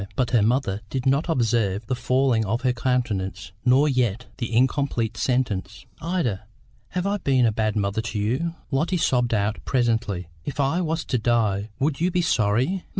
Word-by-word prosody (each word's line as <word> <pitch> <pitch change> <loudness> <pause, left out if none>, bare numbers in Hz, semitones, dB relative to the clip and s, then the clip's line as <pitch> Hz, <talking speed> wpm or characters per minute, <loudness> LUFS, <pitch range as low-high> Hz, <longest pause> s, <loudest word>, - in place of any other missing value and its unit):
But 125 -3 0
her 120 -3 +4
mother 110 -2 +1
did 130 -1 -3
not 140 +6 +2
observe 115 - +1
the 130 - -2
falling 130 -2 +2
of 110 +4 -1
her 125 -1 +2
countenance, 110 -7 -2
nor 130 +4 +4
yet 125 -4 0
the 120 -2 -3
incomplete 120 -2 +1
sentence. 110 -6 -1 0.2
"Ida, 155 - -1 0.4
have 180 0 -3
I 200 +1 +1
been 135 -9 +2
a 115 - +3
bad 110 -1 -1
mother 100 +1 0
to 115 -1 -5
you?" 130 +12 -1 0.2
Lotty 160 +7 +1
sobbed 125 -6 +1
out 105 0 0
presently. 115 - 0 0.2
"If 145 - -6
I 140 +6 +2
was 160 -1 -2
to 125 - 0
die, 110 -3 +1
would 145 +2 -1
you 175 - +3
be 180 -1 0
sorry?" 125 - +1
125 Hz, 175 wpm, -24 LUFS, 110-135 Hz, 0.4 s, her